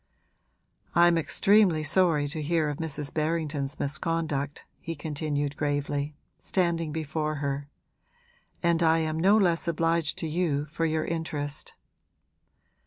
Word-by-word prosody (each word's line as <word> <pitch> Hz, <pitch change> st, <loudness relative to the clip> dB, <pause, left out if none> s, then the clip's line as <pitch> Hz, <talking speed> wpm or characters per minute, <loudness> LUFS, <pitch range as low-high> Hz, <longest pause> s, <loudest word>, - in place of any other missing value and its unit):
'I'm 175 Hz, 0 st, +6 dB
extremely 180 Hz, 0 st, +3 dB
sorry 160 Hz, -3 st, +3 dB
to 155 Hz, +1 st, -4 dB
hear 155 Hz, 0 st, +1 dB
of 145 Hz, -, -5 dB
Mrs. 150 Hz, -3 st, -3 dB
Berrington's 150 Hz, -3 st, -1 dB
misconduct,' 150 Hz, -1 st, -2 dB
he 165 Hz, -, -5 dB
continued 145 Hz, -2 st, -2 dB
gravely, 145 Hz, 0 st, -2 dB, 0.2 s
standing 170 Hz, -4 st, 0 dB
before 155 Hz, 0 st, -2 dB
her. 140 Hz, 0 st, -3 dB, 0.9 s
'And 170 Hz, -1 st, +3 dB
I 165 Hz, -1 st, +4 dB
am 160 Hz, -1 st, -1 dB
no 195 Hz, +5 st, +5 dB
less 175 Hz, -4 st, +2 dB
obliged 165 Hz, -1 st, +1 dB
to 160 Hz, -, -2 dB
you 155 Hz, -3 st, 0 dB
for 165 Hz, -, -1 dB
your 155 Hz, 0 st, 0 dB
interest.' 155 Hz, -3 st, -4 dB
155 Hz, 120 wpm, -27 LUFS, 145-165 Hz, 0.9 s, I'm